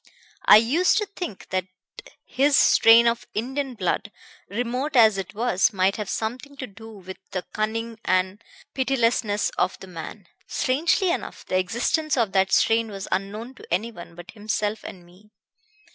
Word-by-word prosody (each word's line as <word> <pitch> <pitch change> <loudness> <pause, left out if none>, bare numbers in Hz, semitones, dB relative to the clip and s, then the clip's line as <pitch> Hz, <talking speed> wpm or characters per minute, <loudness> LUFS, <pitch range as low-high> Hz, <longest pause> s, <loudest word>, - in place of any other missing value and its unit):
"I 210 - +10
used 280 +12 +3
to 425 - +1
think 355 - -8
that 185 -1 -2 0.6
his 280 +2 +2
strain 230 -2 +6
of 235 0 0
Indian 265 +4 -3
blood, 205 +1 -2 0.4
remote 245 +7 -2
as 220 -5 +6
it 190 +1 -7
was, 220 -4 +2
might 190 0 +1
have 210 -3 -5
something 255 +6 -4
to 265 - -5
do 225 +1 -13
with 190 -3 -10 0.2
the 185 - -2
cunning 225 +1 -3
and 185 +3 0 0.3
pitilessness 240 -5 +1
of - - +1
the - - -10
man. 180 +2 -9 0.2
Strangely 335 +8 +1
enough, - - -5
the 185 - 0
existence 255 - 0
of 225 -5 +1
that 190 0 +2
strain 225 0 +3
was 195 -1 -7
unknown 205 +6 -3
to - - -15
anyone 180 -2 -3
but 175 +3 -11
himself 210 0 -3
and 180 -2 -10
me. 185 +5 -21
220 Hz, 160 wpm, -24 LUFS, 195-250 Hz, 0.6 s, I